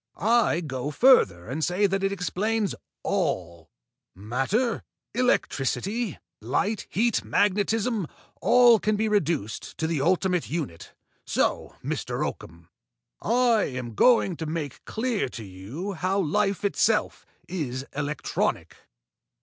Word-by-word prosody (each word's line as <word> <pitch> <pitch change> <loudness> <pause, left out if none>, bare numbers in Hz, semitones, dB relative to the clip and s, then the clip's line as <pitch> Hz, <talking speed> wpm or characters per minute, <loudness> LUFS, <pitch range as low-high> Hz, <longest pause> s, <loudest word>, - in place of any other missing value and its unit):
I 220 -6 +3
go 135 -3 -4
further 145 - +4
and 145 +7 -3
say 180 +5 +2
that 195 0 0
it 195 - +1
explains 200 +3 -1 0.3
all. 85 -2 -2 0.5
Matter, 135 - -1 0.3
electricity, 220 - 0 0.2
light, 195 - -1
heat, 230 +1 +1
magnetism 205 0 +1 0.3
all 240 -2 +6
can 215 +1 +1
be 220 +1 0
reduced 165 - -1
to 160 - -1
the 160 -3 0
ultimate 180 +2 +1
unit. 145 - -5 0.3
So, - - -1
Mr. - - -2
Oakham, 85 0 -8 0.5
I 235 -1 +3
am 125 -3 -5
going 225 - +4
to 160 - -4
make 155 -4 -4
clear 225 - -1
to 115 - -8
you 105 - -6
how 185 +3 -1
life 200 +3 0
itself 210 +2 +1 0.2
is 135 -7 -4
electronic." 145 +1 -2
185 Hz, 115 wpm, -26 LUFS, 135-215 Hz, 0.5 s, all